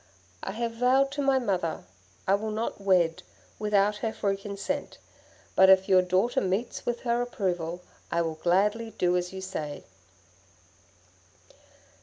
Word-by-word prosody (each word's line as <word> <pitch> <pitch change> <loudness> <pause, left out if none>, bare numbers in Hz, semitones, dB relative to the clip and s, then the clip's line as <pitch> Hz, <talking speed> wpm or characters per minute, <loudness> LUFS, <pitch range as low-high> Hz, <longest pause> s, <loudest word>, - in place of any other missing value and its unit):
'I 195 - -4
have 230 +1 -2
vowed 255 +4 +3
to 285 +1 -3
my 275 -1 +3
mother 185 -9 -1 0.4
I 190 - +4
will 215 +2 0
not 215 -1 -3
wed 180 -4 +2 0.4
without 210 -1 +2
her 220 +1 -2
free 200 -2 -1
consent, 200 +8 -5 0.6
but 190 0 +7
if 190 0 +6
your 185 -1 +6
daughter 185 +6 +1
meets 195 +6 -2
with 240 0 -1
her 240 -1 0
approval, 180 -7 -2 0.3
I 170 0 +2
will 165 -1 -2
gladly 205 +7 +1
do 180 0 +2
as 180 0 -1
you 190 0 -7
say.' 155 -6 -5
195 Hz, 145 wpm, -27 LUFS, 180-230 Hz, 0.6 s, but